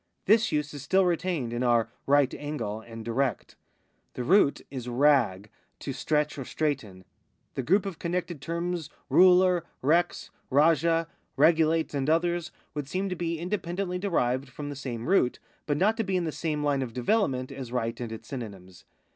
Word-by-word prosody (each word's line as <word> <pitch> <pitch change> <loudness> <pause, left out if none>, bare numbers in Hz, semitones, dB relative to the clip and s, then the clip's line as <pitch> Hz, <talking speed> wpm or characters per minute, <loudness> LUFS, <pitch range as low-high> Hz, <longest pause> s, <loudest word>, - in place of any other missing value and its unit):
This 220 +2 +4
use 150 0 -1
is 145 - -7
still 190 +5 +3
retained 170 -8 -1
in 120 - -2
our 120 -2 +3 0.2
right 140 -1 +4
angle 115 -8 -4
and 115 0 -10
direct. 120 0 -1 0.6
The 125 - -3
root 170 +1 +4
is 125 -3 -5
RAG, 120 -7 +2 0.3
to - - -5
stretch 150 -1 0
or - - -3
straighten. 120 - -3 0.5
The - - -2
group 185 - +2
of 190 -4 -5
eormected 175 -2 -3
terms 170 -1 -3 0.2
ruler, 180 -1 +6 0.2
rex, 170 +5 +1 0.2
rajah, 165 +3 +3 0.3
regulate, 160 -1 +3
and 140 0 -1
others, 170 +1 +1 0.2
would 145 -2 -4
seem 190 +4 -1
to 180 - -2
be 170 -1 -2
independently 180 +1 -3
derived 135 -9 0
from 145 +3 -7
the 145 - -5
same 120 -4 -5
root, 175 -9 +3 0.3
but 145 -1 +1
not 215 +6 +2
to 225 - +1
be 190 -2 0
in 180 - 0
the 160 - -2
same 150 -2 -2
line 145 -2 +1
of 120 -3 -4
development 130 - 0
as 135 -3 -7
right 115 -2 -2
and 120 -2 -4
its 110 - -8
synonyms. 100 -8 -8
150 Hz, 170 wpm, -27 LUFS, 125-175 Hz, 0.6 s, ruler